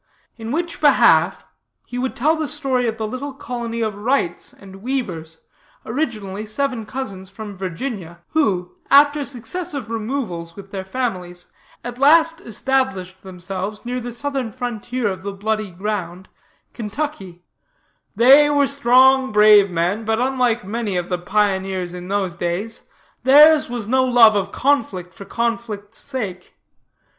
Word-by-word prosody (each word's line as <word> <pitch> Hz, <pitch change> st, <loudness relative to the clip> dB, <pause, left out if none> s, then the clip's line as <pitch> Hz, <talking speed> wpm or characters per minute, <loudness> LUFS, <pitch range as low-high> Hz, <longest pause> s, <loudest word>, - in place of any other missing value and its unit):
In 225 Hz, 0 st, -7 dB
which 335 Hz, +3 st, -3 dB
behalf, 290 Hz, -2 st, +4 dB, 0.4 s
he 245 Hz, -, -6 dB
would 260 Hz, +1 st, -2 dB
tell 305 Hz, +6 st, +2 dB
the 315 Hz, -1 st, -2 dB
story 260 Hz, -4 st, -1 dB
of 225 Hz, -1 st, -2 dB
the 220 Hz, -, -3 dB
little 265 Hz, +4 st, -6 dB
colony 235 Hz, -3 st, -5 dB
of 215 Hz, -1 st, -1 dB
Wrights 205 Hz, -4 st, -1 dB
and 195 Hz, -1 st, -14 dB
Weavers, 180 Hz, -11 st, -4 dB, 0.4 s
originally 215 Hz, -6 st, -3 dB
seven 230 Hz, 0 st, -2 dB
cousins 195 Hz, -8 st, -6 dB
from 205 Hz, 0 st, -8 dB
Virginia, 185 Hz, -1 st, -5 dB
who, 195 Hz, -, 0 dB, 0.2 s
after 290 Hz, +1 st, +5 dB
successive 280 Hz, -, -5 dB
removals 215 Hz, -8 st, -4 dB
with 195 Hz, -1 st, -12 dB
their 190 Hz, -1 st, -4 dB
families, 185 Hz, -5 st, -4 dB, 0.4 s
at 245 Hz, +1 st, -7 dB
last 325 Hz, +3 st, +4 dB
established 210 Hz, -6 st, -2 dB
themselves 190 Hz, +3 st, -6 dB
near 250 Hz, +1 st, -2 dB
the 245 Hz, 0 st, -6 dB
southern 265 Hz, -1 st, -3 dB
frontier 245 Hz, +1 st, -3 dB
of 190 Hz, -2 st, -3 dB
the 200 Hz, +1 st, -5 dB
Bloody 215 Hz, +1 st, -2 dB
Ground, 185 Hz, -1 st, -5 dB, 0.4 s
Kentucky: 210 Hz, -, -5 dB, 0.7 s
'They 275 Hz, +5 st, +7 dB
were 285 Hz, -1 st, +3 dB
strong, 265 Hz, -1 st, +4 dB
brave 210 Hz, -1 st, +6 dB
men; 180 Hz, +5 st, -1 dB
but, 220 Hz, +1 st, 0 dB
unlike 250 Hz, -3 st, +1 dB
many 210 Hz, -2 st, -2 dB
of 175 Hz, -1 st, -3 dB
the 180 Hz, -1 st, -1 dB
pioneers 190 Hz, -2 st, 0 dB
in 180 Hz, 0 st, -8 dB
those 195 Hz, -3 st, -1 dB
days, 175 Hz, +6 st, -3 dB, 0.4 s
theirs 295 Hz, +3 st, +6 dB
was 240 Hz, -4 st, -4 dB
no 260 Hz, +2 st, +3 dB
love 240 Hz, -4 st, +6 dB
of 195 Hz, -1 st, -1 dB
conflict 220 Hz, -10 st, 0 dB
for 200 Hz, -, -11 dB
conflict's 230 Hz, -3 st, -3 dB
sake. 205 Hz, -10 st, -6 dB
225 Hz, 140 wpm, -20 LUFS, 190-260 Hz, 0.7 s, They